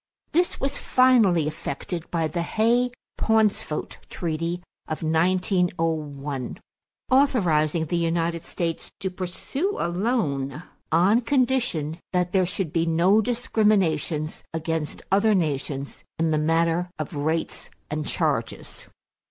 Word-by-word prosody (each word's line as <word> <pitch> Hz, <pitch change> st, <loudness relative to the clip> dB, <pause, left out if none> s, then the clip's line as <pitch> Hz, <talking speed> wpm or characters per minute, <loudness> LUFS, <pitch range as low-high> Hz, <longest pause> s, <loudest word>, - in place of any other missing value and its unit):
This 350 Hz, +3 st, +1 dB
was 275 Hz, +1 st, -1 dB
finally 230 Hz, -, +4 dB
effected 155 Hz, +3 st, -4 dB
by 165 Hz, -2 st, 0 dB
the 170 Hz, +3 st, -2 dB
Hay 230 Hz, +7 st, +2 dB, 0.3 s
Pauncefote 215 Hz, -8 st, +1 dB
treaty 170 Hz, +1 st, -3 dB, 0.2 s
of 155 Hz, +1 st, -4 dB
1901 160 Hz, -, 0 dB, 0.5 s
authorizing 170 Hz, -, +3 dB
the 175 Hz, +3 st, -1 dB
United 170 Hz, 0 st, 0 dB
States 165 Hz, -1 st, -3 dB
to 190 Hz, -, -3 dB
proceed 185 Hz, -, -4 dB
alone, 170 Hz, -, -1 dB, 0.3 s
on 190 Hz, +8 st, +4 dB
condition 240 Hz, -, 0 dB
that 180 Hz, -1 st, +1 dB
there 185 Hz, -2 st, +3 dB
should 185 Hz, -4 st, -2 dB
be 165 Hz, -1 st, +1 dB
no 175 Hz, +6 st, +4 dB
discriminations 195 Hz, -, +1 dB
against 160 Hz, -1 st, -3 dB
other 205 Hz, +2 st, +4 dB
nations 140 Hz, -4 st, -2 dB
in 165 Hz, 0 st, +1 dB
the 155 Hz, -, +2 dB
matter 165 Hz, +3 st, +1 dB
of -, -, -5 dB
rates 160 Hz, +3 st, -2 dB, 0.2 s
and 150 Hz, 0 st, -2 dB
charges. -, -, -2 dB
170 Hz, 110 wpm, -25 LUFS, 155-205 Hz, 0.5 s, finally